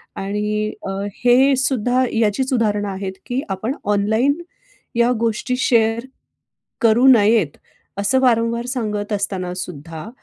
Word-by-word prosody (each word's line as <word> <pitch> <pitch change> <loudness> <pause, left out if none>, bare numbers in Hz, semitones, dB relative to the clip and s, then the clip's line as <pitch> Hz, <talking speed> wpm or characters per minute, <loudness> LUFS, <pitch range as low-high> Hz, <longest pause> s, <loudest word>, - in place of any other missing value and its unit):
आणि 210 +2 -2 0.2
अ, - - -2 0.2
हे 260 +3 +4
सुद्धा, 255 -1 +1
याचीच 230 +4 +1
उदाहरणे 210 -3 +1
आहेत, 190 0 -5
की 250 +2 -2
आपण, 205 +7 -2
ऑनलाईन 220 +7 +1 0.6
या 235 +1 +3
गोष्टी 230 +2 -1
शेअर 230 -1 +2 0.8
करू 235 +3 +4
नयेत. 215 - +4 0.4
असं 260 +6 +2
वारंवार, 235 -1 +2
सांगत 215 -5 -3
असतानासुद्धा, 180 -4 -5
220 Hz, 110 wpm, -20 LUFS, 205-245 Hz, 0.8 s, हे